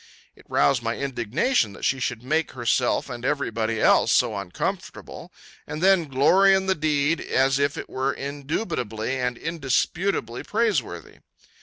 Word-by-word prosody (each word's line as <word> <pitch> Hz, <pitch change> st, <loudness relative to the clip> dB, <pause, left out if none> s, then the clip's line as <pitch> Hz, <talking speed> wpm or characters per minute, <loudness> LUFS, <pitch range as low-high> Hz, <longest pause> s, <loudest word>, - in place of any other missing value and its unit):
It -, -, -21 dB
roused 135 Hz, -3 st, +2 dB
my 115 Hz, 0 st, -2 dB
indignation 125 Hz, -, 0 dB
that -, -, -6 dB
she 135 Hz, -, +1 dB
should 120 Hz, -2 st, -3 dB
make 155 Hz, +5 st, -1 dB
herself 120 Hz, 0 st, 0 dB
and 120 Hz, -, -7 dB
every 140 Hz, -2 st, -1 dB
body 110 Hz, 0 st, -2 dB
else -, -, +4 dB
so -, -, +2 dB
uncomfortable, -, -, -5 dB, 0.4 s
and 150 Hz, -, -5 dB
then 185 Hz, -2 st, +3 dB
glory 190 Hz, +9 st, +5 dB
in 190 Hz, 0 st, 0 dB
the 190 Hz, -, +2 dB
deed 155 Hz, -1 st, 0 dB
as 135 Hz, +1 st, +1 dB
if 140 Hz, 0 st, 0 dB
it -, -, -6 dB
were 130 Hz, +1 st, -1 dB
indubitably 135 Hz, -, -4 dB
and 125 Hz, -1 st, -2 dB
indisputably 160 Hz, -1 st, -1 dB
praiseworthy. 225 Hz, 0 st, -2 dB
140 Hz, 150 wpm, -24 LUFS, 120-165 Hz, 0.4 s, glory